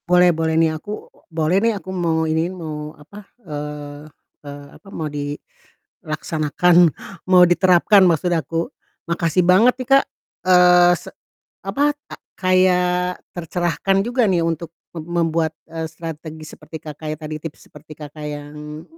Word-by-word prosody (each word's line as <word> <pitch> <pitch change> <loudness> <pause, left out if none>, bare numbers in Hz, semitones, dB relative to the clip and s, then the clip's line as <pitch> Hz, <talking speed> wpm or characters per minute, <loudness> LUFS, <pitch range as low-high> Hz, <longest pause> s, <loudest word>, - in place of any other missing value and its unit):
Boleh 180 0 +5
boleh 160 0 0
nih 165 -1 +3
aku 180 +7 -9 0.4
boleh 160 +2 +1
nih 230 +1 +2
aku 190 - -11
mau 165 -3 0
iniin 160 +3 0
mau 155 -2 -7
apa, 190 +8 -13 0.2
eee 145 -1 -6 0.4
eee, 145 0 -9
apa, - - -19
mau 160 -5 -4
dilaksanakan 150 +2 -3 0.5
mau 180 -1 +7
diterapkan 185 +3 +4
maksud 175 +1 +1
aku, 165 +1 -1 0.4
makasih 170 +1 +1
banget 200 +8 +5
nih 255 - -6
Kak, 275 0 +6 0.4
eee, 180 -1 +6
se - - -11 0.6
apa, 285 +10 +1 0.2
ta - - -7 0.2
kayak 180 -1 +2 0.2
tercerahkan 175 +3 0
juga 240 +3 +1
nih 185 -4 +2
untuk 165 0 -3 0.2
mem 155 - -6 0.2
membuat, 160 0 0 0.2
eee, 165 0 -4
strategi 160 -1 -8
seperti 160 - -10
Kakak 155 0 -8
ya, - - -8
tadi 155 -1 -6
tips 160 -2 -9
seperti 150 +1 -13
Kakak 150 0 -9
yang 150 +1 -7
165 Hz, 140 wpm, -20 LUFS, 155-180 Hz, 0.6 s, mau